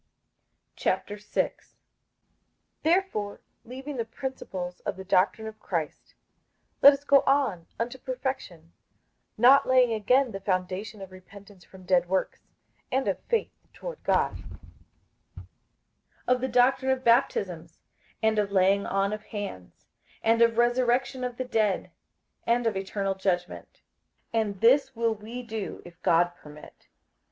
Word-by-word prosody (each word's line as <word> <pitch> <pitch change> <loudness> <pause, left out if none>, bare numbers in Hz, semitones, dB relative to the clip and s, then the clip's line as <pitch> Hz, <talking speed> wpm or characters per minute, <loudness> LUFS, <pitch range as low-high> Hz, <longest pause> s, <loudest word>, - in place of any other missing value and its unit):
58:006:001 205 0 -2 1.1
Therefore 320 - 0 0.2
leaving 265 +4 -7
the 230 - 0
principles 205 -8 -6
of - - -4
the 190 - -7
doctrine 190 +3 +2
of 220 0 -9
Christ, 165 -5 -4 0.7
let 280 - +11
us 280 0 -4
go 280 -1 +5
on 255 -12 +1
unto 240 +3 -3
perfection; 250 - -5 0.6
not 255 +5 +6
laying 255 -2 +4
again 250 +4 +2
the 195 - -5
foundation 190 +2 -3
of 190 - -11
repentance 195 +1 -15
from 185 -1 -16
dead 180 -1 +2
works, 190 0 -2 0.4
and 265 +1 0
of - - 0
faith 465 -2 -1 0.2
toward - - -8
God, - - +1 1.0
58:006:002 - - -11 0.8
Of 250 0 +3
the 260 - 0
doctrine 260 +2 +3
of 260 0 -1
baptisms, 185 -9 +1 0.5
and 220 -1 +3
of 200 -1 0
laying 195 +1 +3
on 195 +1 0
of 215 0 -6
hands, 200 - -8 0.4
and 230 +1 +3
of 230 -1 +4
resurrection 245 +2 +1
of 245 -1 -4
the 255 - -3
dead, 215 -5 0 0.6
and 235 +1 +2
of 225 - +1
eternal 195 0 -2
judgment. 185 -2 -3 0.5
58:006:003 225 - +3
And 200 -3 -4
this 265 +3 +4
will 230 0 +1
we 225 +4 -8
do, 220 -3 -6
if 175 0 -14
God 175 +1 +3
permit. 150 -3 -15
220 Hz, 135 wpm, -27 LUFS, 190-255 Hz, 1.1 s, let